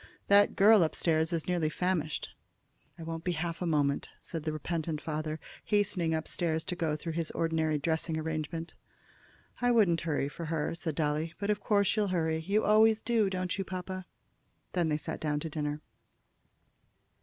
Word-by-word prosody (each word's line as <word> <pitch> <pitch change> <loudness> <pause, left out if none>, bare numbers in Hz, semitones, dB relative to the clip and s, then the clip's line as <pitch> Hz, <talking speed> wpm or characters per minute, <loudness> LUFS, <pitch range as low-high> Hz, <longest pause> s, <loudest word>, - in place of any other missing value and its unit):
"That 200 0 +6
girl 210 +1 +7
up 160 - -1
stairs 160 -1 +2
is 165 -2 -1
nearly 175 -4 +1
famished." 160 -2 -1 0.7
"I 165 - -8
won't 165 0 -5
be 180 - 0
half 170 +1 -3
a 180 - 0
moment," 145 -3 +1
said 165 - -6
the 155 - 0
repentant 155 0 -3
father, 155 0 -3 0.3
hastening 195 -6 +1
up 160 - -3
stairs 160 -2 0
to 185 - -3
go 160 -3 0
through 165 +2 -5
his 165 -1 -2
ordinary 160 -2 0
dressing 160 +2 -1
arrangement. 160 +1 -3 0.9
"I 245 - +3
wouldn't 205 -9 +4
hurry 150 -4 0
for 165 +3 -6
her," 160 -1 -1
said 165 -2 -3
Dolly; 155 +1 -1
"but 200 +1 0
of 210 - 0
course 200 -2 +2
you'll 210 -1 +2
hurry. 160 -3 0
You 200 +6 +1
always 220 +1 +5
do, 225 -3 +2
don't 185 -2 -2
you, - - +1
papa?" 185 0 -5 0.7
Then 175 -3 +1
they 150 - +1
sat 150 - -5
down 150 -1 -1
to 160 - -4
dinner. 150 -1 -3
165 Hz, 180 wpm, -31 LUFS, 155-185 Hz, 0.9 s, girl